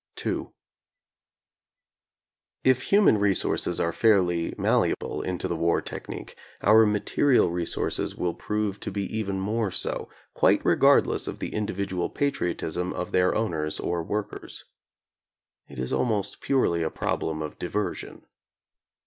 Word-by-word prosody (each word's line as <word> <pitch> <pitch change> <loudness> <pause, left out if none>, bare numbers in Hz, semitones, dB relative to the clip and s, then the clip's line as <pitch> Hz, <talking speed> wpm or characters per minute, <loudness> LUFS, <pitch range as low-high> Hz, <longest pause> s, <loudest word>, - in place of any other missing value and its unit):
ii - - -1 2.2
If 130 -1 +4
human 200 - +5
resources 100 -2 +1
are 85 - 0
fairly 90 -7 +3
malleable - - +1
into 90 -1 -3
the 85 - -2
war 85 +1 +2
technique, - - -7 0.3
our 110 +1 +6
material 105 +1 +2
resources 85 -1 -2
will 90 -1 -1
prove 105 -2 -2
to - - -5
be 100 +1 -2
even 100 -3 -2
more 105 +2 0
so, - - -3 0.2
quite - - +3
regardless - - +4
of - - -4
the - - -4
indi 105 -3 -3
vidual 95 -2 -2
patriotism 90 - -1
of 90 - -4
their 90 0 +3
owners 80 -8 -1
or 85 -1 -1
workers. 105 +5 -5 1.0
It - - -12
is 65 0 -2
almost 110 -5 -1
purely 105 -11 +1
a 80 - 0
problem 80 0 -2
of 75 - -7
diversion. 105 +4 -4
95 Hz, 130 wpm, -26 LUFS, 85-105 Hz, 2.2 s, our